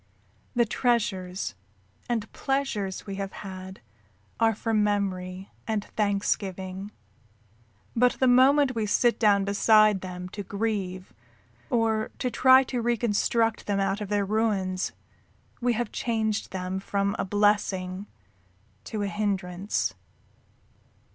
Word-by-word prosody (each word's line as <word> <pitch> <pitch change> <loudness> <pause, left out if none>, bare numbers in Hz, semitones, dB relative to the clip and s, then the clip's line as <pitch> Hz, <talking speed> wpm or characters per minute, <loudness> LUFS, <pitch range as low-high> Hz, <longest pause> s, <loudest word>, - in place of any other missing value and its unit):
The 240 -1 +4
treasures 200 -6 -1 0.6
and 225 -3 -2
pleasures 270 -9 -2
we 195 -2 -5
have 195 -1 -4
had 190 -2 -8 0.6
are 225 -1 +3
for 225 +2 -2
memory 195 -3 -1 0.2
and 215 -2 -1
thanksgiving, 195 -1 -1 1.0
but 250 +1 +4
the 260 - +1
moment 260 +2 +5
we 220 -3 -1
sit 240 +3 +2
down 200 -3 +4
beside 215 0 +4
them 180 -1 -6
to 205 - -6
grieve 195 -3 -3 0.6
or 225 -4 +1
to 250 - -2
try 260 +1 +6
to 250 -2 -3
reconstruct 230 -1 +1
them 200 -1 +1
out 195 +1 0
of 205 - -4
their 205 -1 +1
ruins 195 -3 0 0.7
we 245 0 +2
have 235 -1 -2
changed 220 -3 -1
them 185 0 -3
from 200 0 -1
a - - +1
blessing 195 -1 +1 0.8
to 215 -2 -3
a - - 0
hindrance. 200 -2 -1
205 Hz, 120 wpm, -27 LUFS, 190-225 Hz, 1.0 s, try